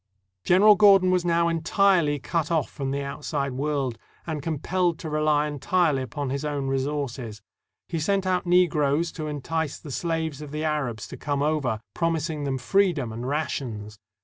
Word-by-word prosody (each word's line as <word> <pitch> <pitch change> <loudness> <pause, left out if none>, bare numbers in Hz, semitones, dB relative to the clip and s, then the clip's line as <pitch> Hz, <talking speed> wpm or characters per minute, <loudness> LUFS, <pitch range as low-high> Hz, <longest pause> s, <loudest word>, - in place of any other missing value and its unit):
General 205 +4 +6
Gordon 195 -3 +6
was 180 -1 +2
now 170 -1 +2
entirely 165 -1 +2
cut 160 +2 -2
off 160 -4 0
from 135 -1 -4
the 140 +1 -2
outside 140 0 -3
world, 135 -3 -2 0.3
and 155 -3 -3
compelled 170 +3 0
to 160 - -6
rely 150 -1 +2
entirely 150 0 +1
upon 130 +2 -4
his 140 0 -2
his - - -5
own 145 -2 -2
resources. 135 -5 -3 0.4
He 165 - -3
sent 195 +4 0
out 180 -1 0
Negroes 165 -3 +3
to 155 -2 -5
entice 150 +1 -3
the 150 - -10
slaves 160 -1 -2
of 150 - -7
the 150 +2 -4
Arabs 135 -9 -2
to - - -8
come 145 -1 -1
over, 140 -8 0
promising 160 -3 -1
them 135 -1 -1
free 190 +9 +2
dom 130 -8 -4
and 120 +3 -5
rations. 120 -8 -3
150 Hz, 175 wpm, -25 LUFS, 140-170 Hz, 0.4 s, General